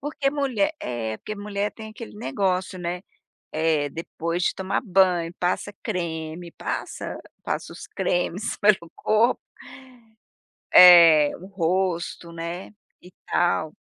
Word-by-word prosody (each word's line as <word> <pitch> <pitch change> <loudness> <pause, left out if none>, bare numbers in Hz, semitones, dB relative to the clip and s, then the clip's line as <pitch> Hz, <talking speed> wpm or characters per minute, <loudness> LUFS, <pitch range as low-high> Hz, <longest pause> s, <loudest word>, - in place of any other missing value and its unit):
Porque 280 -1 -1
mulher 285 +1 0
é 115 -3 -3
porque 215 - -6
mulher 205 0 -3
tem 220 -1 -10
aquele 220 -1 -10
negócio, 185 +3 -1
né. 175 +1 -4 0.5
Eh. 155 -2 +1
Depois 170 +2 -4
de - - +1
tomar 190 +1 -2
banho, 180 -4 +2
passa 180 +3 -1
creme, 170 -4 -4
passa - - -5 0.3
passa - - -4
os - - -10
cremes 180 +4 -2
pelo 200 -5 +3
corpo 225 +3 +2 1.4
eh, 165 -5 +9
o 185 - -10
rosto, 180 -2 -2
né, 170 +4 -6 0.3
e 180 - -15 0.2
tal, 160 -3 +1
180 Hz, 120 wpm, -24 LUFS, 165-205 Hz, 1.4 s, eh